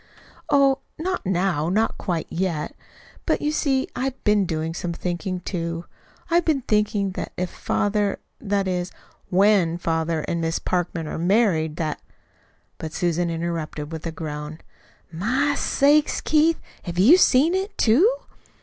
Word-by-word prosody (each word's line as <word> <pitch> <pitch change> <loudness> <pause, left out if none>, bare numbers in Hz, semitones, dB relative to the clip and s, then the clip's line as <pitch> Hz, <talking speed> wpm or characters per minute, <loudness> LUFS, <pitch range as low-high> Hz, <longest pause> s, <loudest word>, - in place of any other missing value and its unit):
"Oh, 275 -1 +4 0.2
not 360 - -3
now 175 -4 +1
not 215 +5 +1
quite 175 -5 -2
yet. 170 -4 -2 0.5
But - - +2
you 300 - 0
see 270 -3 +1
I'VE 265 0 -3
been 210 -2 +3
doing 160 0 -2
some 170 0 -3
thinking, 180 +2 -3
too. 170 -2 -4 0.5
I've 345 +1 +4
been 305 -5 +1
thinking 210 -2 +1
that - - -6
if 180 0 -2
father 205 -1 0 0.2
that 200 -2 -1
is, 180 -1 -2 0.4
WHEN 190 -3 +3
father 165 -1 -1
and 170 +2 -2
Miss 165 0 0
Parkman 175 -2 -2
are - - -4
married 175 -4 +2
that 155 -2 -3 0.4
" - - -39
But 155 -1 -6
Susan 175 -1 0
interrupted 165 -2 -4
with 160 +1 -5
a - - -3
groan. 150 -1 -6 0.5
"My 255 - +1
sakes, 290 +1 +3
Keith, 315 +1 +3 0.3
have 175 -1 -5
you 225 - +8
seen 320 -2 +4
it, 390 +2 -2
too?" 285 - +5
185 Hz, 150 wpm, -23 LUFS, 165-250 Hz, 0.5 s, you